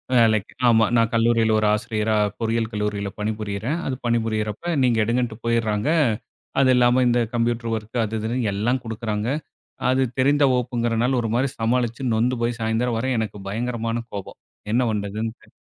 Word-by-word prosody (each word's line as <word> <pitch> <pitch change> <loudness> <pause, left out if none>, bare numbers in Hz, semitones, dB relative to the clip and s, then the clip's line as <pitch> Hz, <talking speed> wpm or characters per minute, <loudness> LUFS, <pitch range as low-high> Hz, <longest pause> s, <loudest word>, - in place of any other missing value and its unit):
வேலைக்கு 110 -4 +3
ஆமா 115 -1 +5
நான் 115 -1 +3
கல்லூரியில 115 -1 +3
ஒரு 110 - +2
ஆசிரியரா, 110 -1 0 0.2
பொறியியல் 115 0 0
கல்லூரியில 105 -2 -2
பணிபுரியறேன். 105 +6 -2
அது 130 - -1
பணிபுரியறப்ப, 115 - -1
நீங்க 120 -3 +3
எடுங்கன்ட்டு 120 0 -1
போயிடுறாங்க. 110 -3 0 0.7
அது 135 -1 +4
இல்லாம, 125 +1 +4
இந்த 120 0 +3
கம்ப்யூட்டர் 115 0 0
ஒர்க் 110 +2 -3
அது 110 +1 -2
இதுன்னு 110 +3 -2 0.2
எல்லா 110 +5 0
குடுக்குறாங்க. 110 -1 -3 0.6
அது 130 +1 +2 0.2
தெரிந்த 145 +2 +4
வகுப்புங்கிறனால, 120 -1 0
ஒரு 115 - -2
மாரி 130 +3 +1
சமாளிச்சு 120 +2 0
நொந்து 120 +3 +1
போய் 120 0 -1
சாயந்திரம் 115 +2 0
வரை 130 +3 -1
எனக்கு 105 -2 -3
பயங்கரமான 115 +1 -2
கோபம். 100 -2 -7 0.3
என்ன 120 +3 +3
பண்றதுன்னு 105 +2 -3
தெ - - -19
115 Hz, 150 wpm, -23 LUFS, 110-120 Hz, 0.7 s, ஆமா